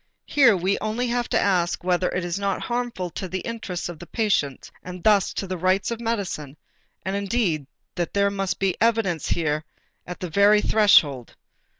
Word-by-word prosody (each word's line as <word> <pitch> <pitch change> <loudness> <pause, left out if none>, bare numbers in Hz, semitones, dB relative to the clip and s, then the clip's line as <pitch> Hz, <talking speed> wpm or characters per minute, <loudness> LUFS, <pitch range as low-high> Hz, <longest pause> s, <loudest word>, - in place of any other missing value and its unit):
Here 245 -8 +5
we 190 +3 0
only 220 +3 -2
have 240 0 -1
to - - +2
ask 175 -3 +1
whether 180 0 +1
it 180 -1 -2
is 175 +2 -3
not 200 -1 -1
harmful 240 -7 -3
to 185 - -5
the 185 +1 -4
interests 220 -6 -5
of 175 -3 -8
the 175 - -10
patient 185 - -1
and 180 -1 -9
thus 210 -3 +4
to - - -2
the 185 -1 -5
rights 185 +5 +1
of 230 - -3
medicine, 190 - -3 0.5
and 190 +1 -2
indeed 195 - -1 0.3
that 200 +3 0
must 195 -1 -2
be 195 -2 0
evident 220 -9 +1
here 155 -2 0 0.4
at 180 - -7
the 180 - -5
very 205 +3 +5
threshold. 150 - +3
190 Hz, 180 wpm, -24 LUFS, 175-215 Hz, 0.5 s, Here